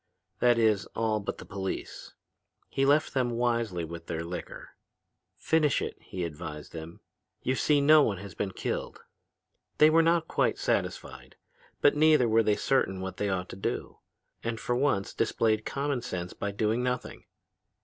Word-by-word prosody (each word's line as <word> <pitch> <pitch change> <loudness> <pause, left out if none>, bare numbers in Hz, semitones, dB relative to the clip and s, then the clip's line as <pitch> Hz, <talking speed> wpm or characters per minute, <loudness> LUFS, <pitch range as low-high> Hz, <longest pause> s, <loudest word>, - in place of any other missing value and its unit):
That 120 -1 +4
is, 110 -4 +2
all 110 -1 +1
but 100 - -5
the - - -10
police. 95 -1 -6 0.5
He 135 0 +1
left 145 +2 +3
them 130 -2 +1
wisely 115 -7 0
with 85 0 -9
their 85 -1 -3
liquor. 85 +1 -7 0.7
'Finish 155 -4 +2
it,' - - -5
he 90 - -5
advised 75 -2 -6
them. 80 +1 -8 0.4
'You 130 - +1
see 145 +2 +2
no 155 +2 +7
one 105 -8 +1
has 100 0 -9
been 100 - -2
killed.' - - -4 0.8
"They 155 +1 +7
were 165 +1 +6
not 165 0 +2
quite - - +1
satisfied, - - -3 0.5
but 145 - +5
neither 150 -4 +5
were 115 0 +4
they 105 -1 +2
certain 95 -8 +1
what 95 0 -5
they 105 - -1
ought 90 -1 -2
to - - -7
do, 95 - -4 0.4
and 115 -1 -3
for 120 - -1
once 125 -7 0
displayed 110 -1 +1
common 140 -2 -1
sense 90 -7 -5
by 100 - -3
doing 110 +3 0
nothing. 125 0 -3
115 Hz, 165 wpm, -28 LUFS, 95-135 Hz, 0.8 s, no